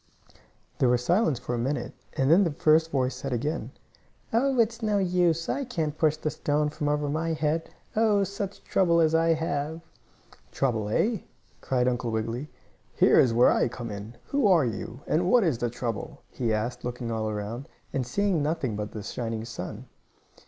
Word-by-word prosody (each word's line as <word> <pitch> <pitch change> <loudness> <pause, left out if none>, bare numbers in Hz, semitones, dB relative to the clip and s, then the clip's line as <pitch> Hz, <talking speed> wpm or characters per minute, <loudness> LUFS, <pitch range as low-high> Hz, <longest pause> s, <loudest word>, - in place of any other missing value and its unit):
There 125 - +4
was 125 0 +1
silence 175 - +3
for 125 0 -5
a 120 - -1
minute, 125 0 -2 0.2
and 135 +2 +2
then 185 +5 +7
the 175 - +1
first 155 +2 +3
voice 130 -4 0
said 135 +2 -5
again: 145 +6 -2 0.6
"Oh, 260 +2 +2
it's 230 +1 +2
no 210 -2 +1
use! 175 -3 +2
I 280 - -1
can't 160 - -2
push 155 -1 +2
the 155 0 -2
stone 150 +1 0
from 150 0 -2
over 150 0 0
my 160 +3 -1
head. 160 +1 -1 0.3
Oh, 215 -2 +3
such 200 0 -5
trouble 170 -3 +3
as 160 -1 +3
I 165 0 +4
have!" 160 0 -2 0.7
"Trouble, 115 -6 0
eh?" 215 - +1 0.4
cried 125 -1 +1
Uncle 120 -1 0
Wiggily. 115 +6 -3 0.5
"Here - - +5
is 125 - +5
where 120 +2 +5
I - - +2
come 120 -1 -6
in. 105 +3 -7
Who 280 -6 +2
are 175 -8 +5
you, 115 +3 -5
and 175 +4 +1
what 245 0 +5
is 155 -10 +1
the 120 - 0
trouble?" 115 -2 -5
he 120 -3 -1
asked, 110 +3 -2
looking 120 -1 -4
all 110 -1 -1
around, 110 +5 -5 0.2
and 135 - 0
seeing 185 +6 0
nothing 145 -7 -1
but 105 0 -4
the 105 - -6
shining 115 0 -4
sun. 110 +1 -7
145 Hz, 185 wpm, -27 LUFS, 120-170 Hz, 0.7 s, then